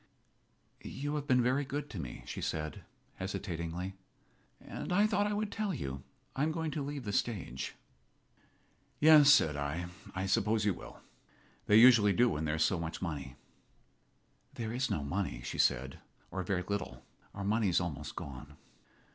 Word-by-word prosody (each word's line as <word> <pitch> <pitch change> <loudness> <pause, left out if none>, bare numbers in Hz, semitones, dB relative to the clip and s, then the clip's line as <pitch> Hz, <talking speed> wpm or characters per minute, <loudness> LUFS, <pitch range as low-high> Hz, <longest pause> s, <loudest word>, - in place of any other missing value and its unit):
"You 145 +2 -4
have 145 -1 -3
been 125 -3 +4
very 130 +4 +2
good 145 +2 -4
to 100 - -6
me," 65 -6 -7
she - - -6
said, 75 -1 -3 0.4
hesitatingly, 90 -1 -4 0.7
"and - - -7
I 205 +4 +4
thought 205 -1 +2
I 210 - -1
would 210 0 -2
tell 210 -5 -2
you. 70 - -5 0.3
I 135 - -2
am 155 +2 +2
going 160 -1 -2
to 150 - -3
leave 140 -1 -5
the 100 -3 -4
stage." 90 - -2 1.2
"Yes," 150 -2 +8
said 80 - +5
I, 75 +4 -2 0.3
"I 95 +1 -1
suppose 105 +2 +2
you 100 - +3
will. - - -11 0.7
They 105 - +5
usually 110 -3 +8
do 120 +6 +4
when 80 -4 -2
there's 80 +1 +1
so 95 0 +1
much 85 0 -4
money." 70 -7 -5 1.2
"There 115 -1 -4
is 130 +2 0
no 75 - -1
money," 80 -5 -3
she - - -5
said, 65 +2 +1 0.3
"or 95 - -2
very 90 0 -1
little. 90 -11 -4 0.3
Our 100 - -4
money 105 0 +2
is 85 - +3
almost 85 -5 -4
gone." 70 +1 -8
100 Hz, 165 wpm, -32 LUFS, -, 1.2 s, Yes